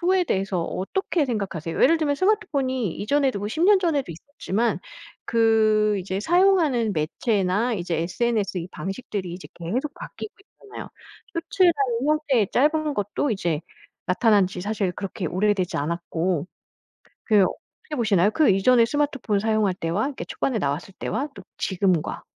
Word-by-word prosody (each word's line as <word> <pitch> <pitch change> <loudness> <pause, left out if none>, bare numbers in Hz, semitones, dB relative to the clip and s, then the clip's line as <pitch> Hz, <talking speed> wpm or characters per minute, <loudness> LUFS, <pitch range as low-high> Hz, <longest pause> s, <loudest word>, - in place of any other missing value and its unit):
후에 365 +1 +2
대해서 190 - -1
어떻게 315 - -1
생각하세요? 190 - -3
예를 330 - +5
들면 295 -3 +1
스마트폰이 280 - 0
이전에도 265 +1 +1
뭐 205 +1 -3
10 315 +10 -2
년 405 +1 +6
전에도 315 - 0
있었지만 215 - -2 0.5
그 215 -2 +3
이제 190 +1 -3
사용하는 325 - +3
매체나 200 +7 0
이제 175 -4 -2
SNS 200 +3 -1
이 175 +1 -6
방식들이 195 -2 -5
이제 180 - -9
계속 245 - -3
바뀌고 425 - -8 0.3
있잖아요. 420 0 -9 0.5
쇼츠나 350 +2 +3 0.3
이 280 - -1
형태의 295 -9 +2
짧은 305 +2 +2
것도 205 +6 -1
이제 170 -7 -1 0.5
나타난 200 +1 +3
지 180 0 -7
사실 205 -2 -1
그렇게 195 0 -5
오래되지 185 0 0
않았고 170 +1 -2 0.8
그 210 -3 +4
어떻게 300 +10 -6
보시나요? 210 -5 +3
그 310 -3 +3
이전에 230 +5 +5
스마트폰 275 -6 0
사용할 215 -2 +1
때와 180 +7 -1
이렇게 285 - -6
초반에 260 -4 -2
나왔을 150 +4 -3
때와 290 +3 -2
또 - - -11 0.2
지금과 185 -4 0
215 Hz, 350 characters per minute, -24 LUFS, 185-285 Hz, 0.8 s, 년